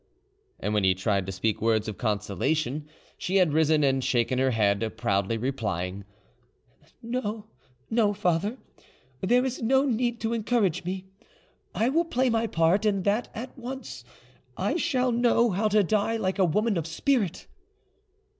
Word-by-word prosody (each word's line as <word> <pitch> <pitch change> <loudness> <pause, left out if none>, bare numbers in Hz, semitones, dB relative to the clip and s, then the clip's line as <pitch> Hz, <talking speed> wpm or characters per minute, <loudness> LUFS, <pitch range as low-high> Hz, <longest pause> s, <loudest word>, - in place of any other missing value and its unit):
And 105 - -2
when 105 -2 +2
he 95 -1 +4
tried 95 0 0
to - - -3
speak 100 +3 -1
words 110 -1 +1
of 110 - -6
consolation, 130 - -1 0.3
she 185 - -2
had 180 -6 +4
risen 155 -1 +3
and 135 -1 +2
shaken 120 +1 +1
her 130 0 +3
head, 110 -1 0
proudly 100 +3 0
replying— 100 -6 -3 1.0
"No, 225 -3 -3 0.5
no, 220 -2 +3
father; 200 +3 0 0.6
there 245 +6 +3
is 260 -1 -3
no 265 +4 +3
need 240 -2 0
to 225 +1 -1
encourage 215 -6 0
me. 185 +1 -4 0.7
I 230 +3 +2
will 330 +5 +2
play 260 -5 +1
my 225 0 +1
part, 170 +3 +2
and 200 -3 +1
that 210 +5 0
at 240 +4 -7
once: 240 - -7 0.5
I 200 - 0
shall 260 -7 +1
know 235 -1 +3
how 200 +4 +1
to 210 0 +3
die 215 +4 +1
like 190 -2 -2
a 190 - +5
woman 210 +4 +1
of 165 -1 -2
spirit." 205 - 0
190 Hz, 155 wpm, -27 LUFS, -, 1.0 s, a